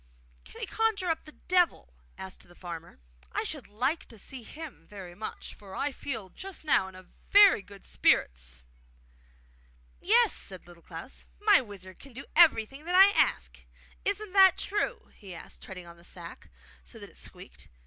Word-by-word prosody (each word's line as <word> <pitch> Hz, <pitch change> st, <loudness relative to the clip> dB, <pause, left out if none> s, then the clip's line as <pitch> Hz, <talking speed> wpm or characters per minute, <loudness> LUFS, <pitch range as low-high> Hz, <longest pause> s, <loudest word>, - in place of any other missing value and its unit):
'Can -, -, -12 dB
he -, -, -1 dB
conjure 420 Hz, -5 st, +1 dB
up 320 Hz, -, -3 dB
the 305 Hz, -, -11 dB
Devil?' 360 Hz, +2 st, +1 dB, 0.2 s
asked 190 Hz, -1 st, -9 dB
the 175 Hz, -, -17 dB
farmer. 170 Hz, -2 st, -8 dB, 0.4 s
'I -, -, 0 dB
should -, -, -5 dB
like 255 Hz, +10 st, -1 dB
to 230 Hz, -, -13 dB
see 255 Hz, +5 st, -7 dB
him 270 Hz, -, -10 dB
very 190 Hz, -4 st, -9 dB
much, 210 Hz, +4 st, -7 dB
for 195 Hz, -2 st, -12 dB
I 290 Hz, -, -1 dB
feel 225 Hz, -8 st, -5 dB
just 385 Hz, -3 st, -7 dB
now 235 Hz, -10 st, +3 dB
in 190 Hz, -, -12 dB, 0.3 s
very 405 Hz, -, +8 dB
good 200 Hz, 0 st, -14 dB
spirits!' -, -, +1 dB, 1.4 s
'Yes,' 455 Hz, +3 st, +5 dB
said 185 Hz, -2 st, -6 dB
Little 175 Hz, -1 st, -15 dB
Klaus; 165 Hz, +8 st, -8 dB
'my 415 Hz, -1 st, +6 dB
wizard 190 Hz, -5 st, -10 dB
can 275 Hz, -2 st, -13 dB
do 270 Hz, +4 st, -8 dB
everything 275 Hz, -3 st, +5 dB
that 355 Hz, +1 st, 0 dB
I 390 Hz, +2 st, +9 dB
ask. -, -, +1 dB, 0.4 s
Isn't 405 Hz, 0 st, -1 dB
that 380 Hz, -2 st, +7 dB
true?' 445 Hz, +4 st, -2 dB
he 195 Hz, -4 st, -10 dB
asked, -, -, -11 dB
treading 180 Hz, -2 st, -8 dB
on 170 Hz, 0 st, -13 dB
the 170 Hz, -, -18 dB
sack 175 Hz, -1 st, -9 dB, 0.3 s
so 60 Hz, -, -11 dB
that -, -, -10 dB
it -, -, -22 dB
squeaked. -, -, -10 dB
230 Hz, 170 wpm, -29 LUFS, -, 1.4 s, I